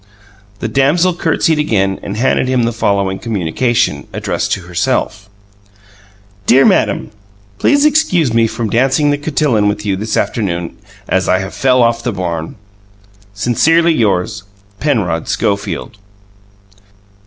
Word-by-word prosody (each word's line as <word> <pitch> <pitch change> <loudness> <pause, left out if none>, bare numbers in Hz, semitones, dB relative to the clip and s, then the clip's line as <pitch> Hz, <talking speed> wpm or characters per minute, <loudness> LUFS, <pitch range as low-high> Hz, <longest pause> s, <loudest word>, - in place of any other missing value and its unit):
The - - -1
damsel 165 +7 +2
curtsied 160 -2 0
again 95 -9 0
and 100 - -6
handed 130 +1 +1
him 130 -2 +1
the 115 - 0
following 100 -3 0
communication, 110 - -1
addressed - - -2
to 95 - -3
herself: 100 +2 -2 1.2
"Dear 135 +3 +5
madam - - +1 0.5
Please 285 0 +3
excuse 185 - +2
me 115 0 +3
from 110 -1 -4
dancing 135 +5 +2
the 145 - 0
cotilon 145 -8 +1
with 105 +1 -2
you 100 -2 0
this 110 +3 -3
afternoon 90 -6 -2 0.3
as 95 0 0
I 95 - +4
have 95 +1 -5
fell 130 -2 +3
off 115 0 +1
the 120 - -2
barn 85 -5 -4 0.8
"Sincerly 165 +11 +2
yours 105 - 0 0.4
"PENROD 105 - -1
SCHOFIELD." 105 +3 -2
115 Hz, 130 wpm, -15 LUFS, 95-135 Hz, 1.2 s, Dear